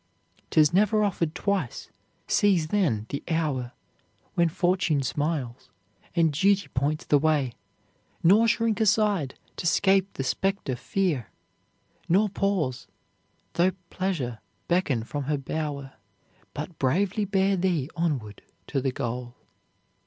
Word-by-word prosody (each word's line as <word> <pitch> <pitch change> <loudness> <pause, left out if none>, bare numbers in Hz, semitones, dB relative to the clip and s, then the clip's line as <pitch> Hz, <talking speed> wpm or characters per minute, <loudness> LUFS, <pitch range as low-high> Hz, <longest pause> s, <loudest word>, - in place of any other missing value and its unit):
"'Tis 155 +1 +4
never 210 +3 +3
offered 170 -5 -1
twice; 190 -9 -2 0.4
seize, 180 -7 +3
then, 150 - +1
the 140 - -3
hour 145 -7 -1 0.6
When 170 -1 +3
fortune 175 -4 +1
smiles, 140 -3 -2 0.5
and 165 -3 +3
duty 195 +6 +2
points 145 +4 -1
the 145 - +4
way; 145 -5 +1 0.7
Nor 210 +7 +6
shrink 230 -1 +1
aside 205 -9 +2 0.2
to 170 - -2
'scape 195 +3 +3
the 135 - -3
specter 190 -2 -1
fear, 150 - -1 0.8
Nor 200 +5 +4
pause, 185 -11 -1 0.7
though 180 +2 +3 0.2
pleasure 150 - -2 0.3
beckon 160 -10 +1
from 140 +4 -4
her 150 +1 0
bower; 140 -1 -4 0.6
But 155 +3 -6
bravely 195 +10 +1
bear 195 0 +2
thee 175 -7 0
onward 140 - -2 0.3
to 135 - 0
the 135 0 0
goal." 120 0 -4
165 Hz, 120 wpm, -26 LUFS, 135-195 Hz, 0.8 s, Nor